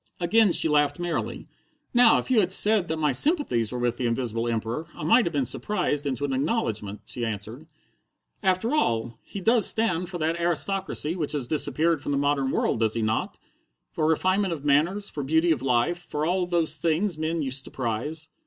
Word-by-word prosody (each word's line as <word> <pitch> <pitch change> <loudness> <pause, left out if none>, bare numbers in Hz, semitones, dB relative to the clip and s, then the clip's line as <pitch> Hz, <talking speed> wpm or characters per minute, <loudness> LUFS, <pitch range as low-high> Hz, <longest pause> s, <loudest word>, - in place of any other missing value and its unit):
Again 205 +4 +3
she 165 - +4
laughed 145 -1 +2
merrily. 175 -1 -4 0.5
"Now, 245 -2 +6
if - - -4
you 245 - +5
had 185 -3 +1
said 205 -1 +5
that 160 - -2
my 150 -2 +1
sympathies 205 - +2
were 125 - -4
with 120 -1 -1
the 125 - -1
Invisible 115 -1 -2
Emperor, 115 +7 -3
I - - -8
might 230 +9 +4
have - - -2
been 140 -4 0
surprised 150 - -2
into 135 0 -2
an 135 - -2
acknowledgment," 110 - -2
she 120 - -4
answered. 115 +6 -5 0.7
"After 190 +6 0
all, 115 - -1
he 200 - -8
does 225 +1 +5
stand 180 -6 0
for 180 - -5
that 165 +1 -1
aristocracy 175 -1 -1
that 160 -5 -3
has 145 -4 -2
disappeared 155 +3 +1
from 145 - -3
the - - 0
modern 140 -1 0
world, 115 - 0
does 110 -1 +1
he 115 - -1
not? 110 0 -2 0.5
For 155 - -1
refinement 185 +3 +1
of 150 -3 -8
manners, 170 +9 +1
for 145 - -6
beauty 160 +5 +2
of 145 -6 0
life, 135 +7 +1
for 155 -3 -4
all 180 +1 0
those 165 -3 0
things 170 +4 0
men 160 0 -1
used 135 0 -3
to - - -9
prize." 135 +6 -4
155 Hz, 200 wpm, -25 LUFS, 130-180 Hz, 0.7 s, Now